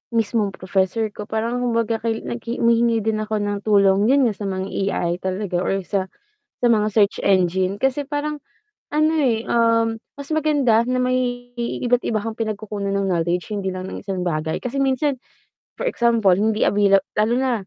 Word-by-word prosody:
mismong 215 Hz, -3 st, 0 dB
professor 190 Hz, +4 st, -1 dB
ko. 210 Hz, 0 st, -8 dB
Parang 230 Hz, +3 st, -2 dB
kumbaga 230 Hz, -2 st, 0 dB
kaili 225 Hz, 0 st, -2 dB
naghi 235 Hz, 0 st, -4 dB
humihingi 230 Hz, -1 st, +3 dB
din 220 Hz, 0 st, 0 dB
ako 215 Hz, 0 st, -2 dB
ng 205 Hz, 0 st, -2 dB
tulong 200 Hz, 0 st, +4 dB
'yon 275 Hz, +2 st, +4 dB
nga, 230 Hz, -4 st, +2 dB
sa 205 Hz, -, -5 dB
mga 190 Hz, 0 st, -3 dB, 0.3 s
AI 170 Hz, -, 0 dB
talaga 190 Hz, -1 st, -2 dB
or 195 Hz, +1 st, -1 dB
sa 190 Hz, 0 st, -2 dB, 0.5 s
sa 245 Hz, -, +4 dB
mga 215 Hz, -2 st, +3 dB
search 205 Hz, -2 st, +3 dB
engine. 185 Hz, +1 st, +2 dB
Kasi 270 Hz, +2 st, 0 dB
parang 295 Hz, +1 st, -3 dB, 0.6 s
ano, 310 Hz, +1 st, +3 dB
eh, 245 Hz, -7 st, +2 dB
um, 230 Hz, -1 st, +2 dB, 0.2 s
mas 280 Hz, 0 st, -10 dB
maganda 285 Hz, -7 st, +2 dB
na 255 Hz, 0 st, 0 dB
may 250 Hz, -1 st, -1 dB
iba't 240 Hz, +1 st, 0 dB
iba 215 Hz, -2 st, 0 dB
kang 225 Hz, +1 st, -5 dB
pinagkukunan 210 Hz, -2 st, -3 dB
ng 200 Hz, -1 st, 0 dB
knowledge, 175 Hz, +2 st, -1 dB
hindi 195 Hz, -3 st, -3 dB
lang 185 Hz, 0 st, -6 dB
ng -, -, -7 dB
isang 190 Hz, -2 st, -3 dB
bagay. 160 Hz, -3 st, -2 dB
Kasi 250 Hz, +2 st, -4 dB
minsan, 270 Hz, +1 st, +1 dB, 0.6 s
for -, -, -5 dB
example, 235 Hz, -, +3 dB
hindi 215 Hz, +4 st, +2 dB
availa 200 Hz, -1 st, +4 dB, 0.2 s
lalo 220 Hz, +3 st, +2 dB
na 260 Hz, 0 st, +1 dB
220 Hz, 175 wpm, -21 LUFS, 195-245 Hz, 0.6 s, tulong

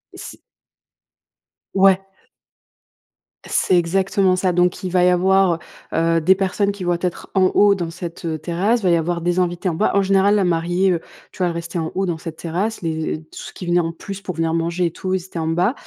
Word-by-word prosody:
C -, -, -10 dB, 1.4 s
Ouais. 195 Hz, -1 st, +5 dB, 1.5 s
C'est 180 Hz, -, +2 dB
exactement 190 Hz, +2 st, +2 dB
ça. 185 Hz, 0 st, +1 dB
Donc 180 Hz, +1 st, +1 dB
il 185 Hz, -, -2 dB
va 180 Hz, 0 st, +3 dB
y -, -, +5 dB
avoir, 185 Hz, -1 st, +3 dB, 0.3 s
heu, 165 Hz, 0 st, +2 dB
des 185 Hz, +4 st, +4 dB
personnes 200 Hz, +1 st, 0 dB
qui 195 Hz, -2 st, -7 dB
vont 175 Hz, -1 st, +1 dB
être 180 Hz, -1 st, -4 dB
en 190 Hz, -1 st, +4 dB
haut 205 Hz, -1 st, +6 dB
dans 175 Hz, -4 st, -3 dB
cette, 170 Hz, 0 st, -8 dB
heu, 160 Hz, -1 st, -2 dB
terrasse, 190 Hz, +9 st, 0 dB
il -, -, -14 dB
va 180 Hz, -, +3 dB
y 170 Hz, -, +4 dB
avoir 170 Hz, +1 st, -2 dB
des 175 Hz, +1 st, 0 dB
invités 175 Hz, +1 st, 0 dB
en 165 Hz, -, -3 dB
bas. 210 Hz, -, +1 dB
En 200 Hz, -, +4 dB
général, 195 Hz, +1 st, +3 dB
la 200 Hz, -, +2 dB
mariée, 175 Hz, +2 st, +1 dB
heu, 170 Hz, -, 0 dB, 0.3 s
tu -, -, -17 dB
vois, 180 Hz, -, +1 dB
elle 170 Hz, -, -2 dB
restait 170 Hz, +1 st, -4 dB
en 160 Hz, 0 st, -2 dB
haut 195 Hz, 0 st, 0 dB
dans 170 Hz, -3 st, -2 dB
cette 160 Hz, -1 st, -7 dB
terrasse, 185 Hz, +8 st, -3 dB
les 160 Hz, -1 st, -2 dB
et 155 Hz, -, -6 dB
tout 155 Hz, -, -28 dB
ceux -, -, -9 dB
qui 180 Hz, -, -8 dB
venaient 175 Hz, 0 st, +2 dB
en 165 Hz, -1 st, -2 dB
plus 195 Hz, +3 st, -8 dB
pour 185 Hz, -3 st, -6 dB
venir 165 Hz, 0 st, 0 dB
manger 170 Hz, +1 st, 0 dB
et -, -, -5 dB
tout, 185 Hz, +2 st, -4 dB
ils 185 Hz, -2 st, -1 dB
étaient 180 Hz, -2 st, -7 dB
en 160 Hz, -, -2 dB
bas. 175 Hz, +8 st, +1 dB
180 Hz, 230 wpm, -20 LUFS, 165-190 Hz, 1.5 s, haut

